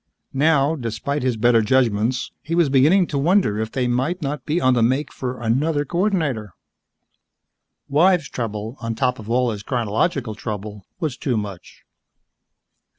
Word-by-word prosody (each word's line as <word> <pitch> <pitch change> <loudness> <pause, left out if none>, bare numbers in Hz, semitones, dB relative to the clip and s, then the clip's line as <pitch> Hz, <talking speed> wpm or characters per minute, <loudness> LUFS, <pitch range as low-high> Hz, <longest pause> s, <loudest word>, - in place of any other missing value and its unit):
Now, 145 +1 +3
despite 125 +2 -3
his 125 -2 0
better 115 0 +4
judgments, 120 0 +1
he 165 +3 -3
was 170 -4 +3
beginning 150 +8 +4
to 145 -4 -2
wonder 160 - +2
if 110 0 -3
they 130 -2 -1
might 130 +9 0
not 145 -2 -4
be 155 +3 +1
on 130 -6 +3
the 120 - +2
make 130 +6 +1
for 125 -1 -5
another 145 +6 0
coordinator. 155 - -1 1.3
Wives 165 +1 +3
trouble, 110 +1 -5
on 115 -1 -3
top 125 +1 0
of 110 0 -9
all 125 0 +2
his 105 -2 -5
chronological 115 - -1
trouble, 105 -1 -6
was 155 -8 -2
too 125 -5 -1
much. 100 -4 -7
130 Hz, 150 wpm, -21 LUFS, 115-150 Hz, 1.3 s, better